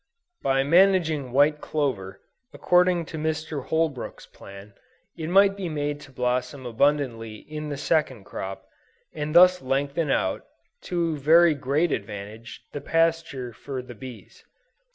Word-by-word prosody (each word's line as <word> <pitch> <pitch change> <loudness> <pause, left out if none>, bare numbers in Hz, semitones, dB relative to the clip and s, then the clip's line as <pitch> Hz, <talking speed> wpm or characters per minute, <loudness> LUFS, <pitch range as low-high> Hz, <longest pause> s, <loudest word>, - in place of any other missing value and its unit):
By 135 0 +2
managing 165 -4 +3
white 145 +3 +3
clover, 110 -11 -3 0.3
according 180 -1 +3
to 160 +1 -7
Mr. 155 -2 -3
Holbrook's 160 -6 -2
plan, 100 +1 -13 0.4
it 160 -2 -5
might 195 +2 +5
be 190 -3 -4
made 145 -1 -2
to 140 - -13
blossom 125 +1 -2
abundantly 120 -3 0
in 150 +6 -7
the 145 - -4
second 135 -8 0
crop, 95 0 -7 0.5
and 150 +1 -4
thus 180 +1 +7
lengthen 140 +4 -1
out, 95 - 0 0.4
to 170 -3 -1
very 165 +3 +6
great 145 +4 0
advantage, 105 +2 -6
the 145 - -6
pasture 165 -7 0
for 130 +3 -6
the 125 - -10
bees. 120 0 -12
145 Hz, 135 wpm, -25 LUFS, 125-160 Hz, 0.5 s, thus